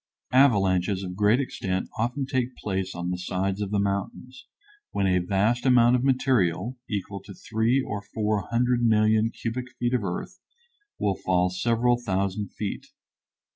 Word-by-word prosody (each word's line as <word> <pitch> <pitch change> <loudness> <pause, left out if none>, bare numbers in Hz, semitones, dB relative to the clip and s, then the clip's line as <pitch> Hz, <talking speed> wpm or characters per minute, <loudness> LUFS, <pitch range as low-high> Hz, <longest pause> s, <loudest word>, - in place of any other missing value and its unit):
Avalanches 100 -7 +3
of 90 -1 -5
great 105 +5 +3
extent 95 -8 -2
often 125 +5 -1
take 130 -1 -2
place 95 -2 -3
on 90 +1 -3
the 90 - -3
sides 95 +2 -2
of 100 - -2
the 105 - 0
mountains, 100 +6 -3 0.4
when 100 - -1
a 90 -1 +3
vast 100 +7 +1
amount 125 -2 +5
of 125 - 0
material, 125 - +1
equal 100 -2 -4
to 100 0 -12
three 115 +6 +1
or 105 -6 -4
four 105 -1 -2
hundred 120 +1 +1
million 110 -1 +3
cubic 120 +2 -4
feet 120 0 -1
of 125 -4 +1
earth, 100 - -5 0.6
will 100 -2 0
fall 90 -1 +2
several 120 +5 +1
thousand 100 0 -1
feet. 100 0 -5
105 Hz, 155 wpm, -26 LUFS, 95-120 Hz, 0.6 s, amount